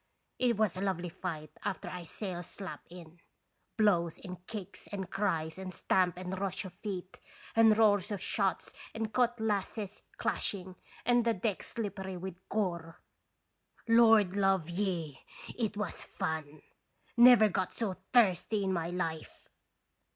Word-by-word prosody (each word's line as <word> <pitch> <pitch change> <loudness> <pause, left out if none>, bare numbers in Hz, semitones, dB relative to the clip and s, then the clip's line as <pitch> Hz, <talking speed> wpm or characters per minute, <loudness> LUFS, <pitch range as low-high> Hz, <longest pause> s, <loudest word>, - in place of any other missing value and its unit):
It 240 -3 +2
was 215 -5 +2
a 185 - -4
lovely 180 -3 -1
fight 160 -4 -5
after - - -3
I 180 -1 -6
sails 175 -1 -5
slap 195 -2 -7
in. 170 -1 -12 0.6
Blows 175 -7 +3
and 180 -2 -9
kicks 205 -4 -7
and 190 -3 -5
cries 175 -5 -1
and 190 -1 -5
stamp 180 -1 +1
and 185 +1 -4
rush 195 0 -2
of 185 - -8
feet, 185 -1 -6 0.4
and 225 -1 +6
roar 215 -2 +6
of 200 +1 -5
shots 195 0 -1 0.2
and 220 -1 -3
cutlasses 220 -4 0 0.2
clashing, 185 -2 -1 0.3
and 245 0 +4
the 230 -1 +2
deck 200 +1 -1
slippery 195 -4 -5
with 185 +1 -5 0.2
gore! 175 -5 -2 0.9
Lord 225 -4 +6
love 195 -4 +2
ye! 170 -6 -2 0.4
it 220 -4 -2
was 210 -4 -3
fun! 155 -1 -4 0.5
Never 240 -2 +8
got 185 -2 -1
so 215 -5 -1 0.2
thirsty 210 -2 +3
in 190 -1 0
my 170 -1 -1
life 165 -3 -4
190 Hz, 140 wpm, -32 LUFS, 175-215 Hz, 0.9 s, Never